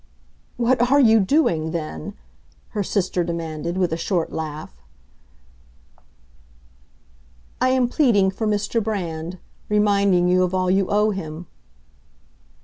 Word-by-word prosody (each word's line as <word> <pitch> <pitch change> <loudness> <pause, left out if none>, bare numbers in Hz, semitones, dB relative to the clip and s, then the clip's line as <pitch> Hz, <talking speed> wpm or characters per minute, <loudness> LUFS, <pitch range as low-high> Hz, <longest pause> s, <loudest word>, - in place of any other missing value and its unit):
"What 245 0 +2
are 280 +2 +5
you 225 -4 +6
doing, 185 - +1
then?" 155 - -5 0.5
her 210 - -3
sister 185 -2 -1
demanded, 170 0 -4
with 180 -3 0
a - - -1
short 170 -1 -1
laugh. 155 - -6 2.9
"I 255 - +3
am 255 -1 +2
pleading 230 -8 +3
for 220 +3 -3
Mr. 210 +2 0
Brand—reminding 195 +1 0
you 180 +1 +3
of 185 0 0
all 185 -1 +1
you 190 0 +2
owe 210 +1 +2
him." 165 -3 -6
190 Hz, 115 wpm, -22 LUFS, 170-215 Hz, 2.9 s, you